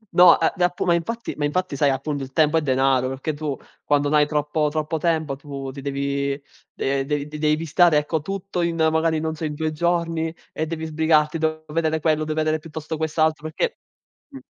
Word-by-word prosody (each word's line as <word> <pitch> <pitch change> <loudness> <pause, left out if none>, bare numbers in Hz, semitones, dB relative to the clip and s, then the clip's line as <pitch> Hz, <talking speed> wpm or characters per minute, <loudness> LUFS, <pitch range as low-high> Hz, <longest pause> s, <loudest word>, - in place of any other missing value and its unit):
No, 175 -1 +8
eh 165 - +2
d 180 - -7
app 180 0 0
ma 175 - +3
infatti 230 +8 -2
ma 145 - 0
infatti, 180 +1 -1
sai, 140 +1 +3
appunto, 140 +1 -2
il 135 - -9
tempo 155 +1 +3
è - - +2
denaro, 130 -2 +2
perché 135 +4 -3
tu 145 -2 -3 0.3
quando 145 0 +2
no 150 - +4
hai 150 0 +4
troppo 150 0 0
troppo 155 +1 -2
tempo 160 -3 0
tu 140 -1 -7
ti 140 +1 -9
devi, 140 0 -1 0.4
eh, 135 0 0
dev 145 0 -1
devi 155 +1 0
stare, 165 0 +4
ecco, 150 +1 0
tutto 195 +2 -4
in 170 -1 0
magari, 160 0 +2
non 160 0 -2
so, 160 - -4
in 150 -1 -3
2 155 +1 -1
giorni 165 0 0 0.2
e 160 - -3
devi 160 0 -4
sbrigarti. 155 0 +2
Devo 155 0 -1
vedere 160 0 0
quello, 155 0 +1
deve 155 0 -3
vedere 155 0 +1
piuttosto 160 0 -6
quest'altro 155 0 0
perché 465 - -1 0.5
mh 275 - -10
155 Hz, 205 wpm, -23 LUFS, 145-165 Hz, 0.5 s, No